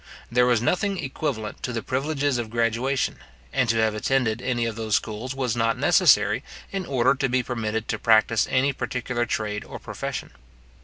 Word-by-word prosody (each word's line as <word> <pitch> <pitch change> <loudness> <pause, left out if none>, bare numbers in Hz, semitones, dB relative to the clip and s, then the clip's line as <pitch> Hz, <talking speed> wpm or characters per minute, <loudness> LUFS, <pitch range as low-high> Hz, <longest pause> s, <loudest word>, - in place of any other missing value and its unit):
There 125 +1 +4
was 120 -2 +2
nothing 195 - +1
equivalent 135 -7 -4
to 125 - -3
the 115 -2 -3
privileges 140 0 0
of 115 -2 -4
graduation; 120 +4 0 0.4
and 130 -3 +1
to 115 - +3
have 110 -1 +2
attended 115 0 0
any 120 -2 0
of 115 -1 -3
those 110 -2 0
schools 115 +4 -3
was 125 -4 -1
not 115 -1 +1
necessary, - - +4 0.3
in 195 -2 -3
order 130 -2 +3
to 135 -1 -1
be 125 0 +1
permitted 110 -2 -3
to - - -1
practise 115 0 +4
any 135 +2 +2
particular 125 -2 -2
trade 105 -2 -2
or - - -8
profession. - - -5
120 Hz, 175 wpm, -24 LUFS, 110-130 Hz, 0.4 s, There